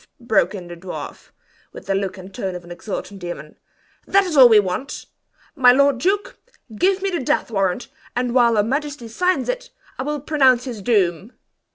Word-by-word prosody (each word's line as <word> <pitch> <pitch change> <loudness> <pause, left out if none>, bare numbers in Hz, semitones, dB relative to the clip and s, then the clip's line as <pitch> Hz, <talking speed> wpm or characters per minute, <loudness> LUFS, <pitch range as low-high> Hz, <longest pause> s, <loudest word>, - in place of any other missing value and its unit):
broke 210 -5 +1
in 180 -3 -8
the 175 - -8
dwarf, 180 +2 -8 0.4
with - - -11
the 195 - 0
look 195 -1 -2
and 185 +1 -11
tone 190 -1 -4
of 180 - -7
an 175 - -13
exultant 200 +2 -6
demon. 175 -4 -7 0.5
"That 395 0 +4
is 355 -5 -3
all 260 -3 +9
we 220 -2 +7
want! 200 +8 -3 0.5
My 255 -4 +6
lord 280 0 +3
duke, 410 - -1 0.4
give 380 - +1
me 390 - 0
the 345 - -1
death 250 -2 -1
warrant, 195 +2 -1 0.3
and 245 0 -1
while 240 -2 +4
her 210 - +3
majesty 280 +1 -3
signs 360 +11 0
it, - - -3 0.3
I - - 0
will 295 +2 -2
pronounce 265 -4 +3
his 240 -5 -6
doom!" 195 -1 0
235 Hz, 190 wpm, -21 LUFS, 195-285 Hz, 0.5 s, all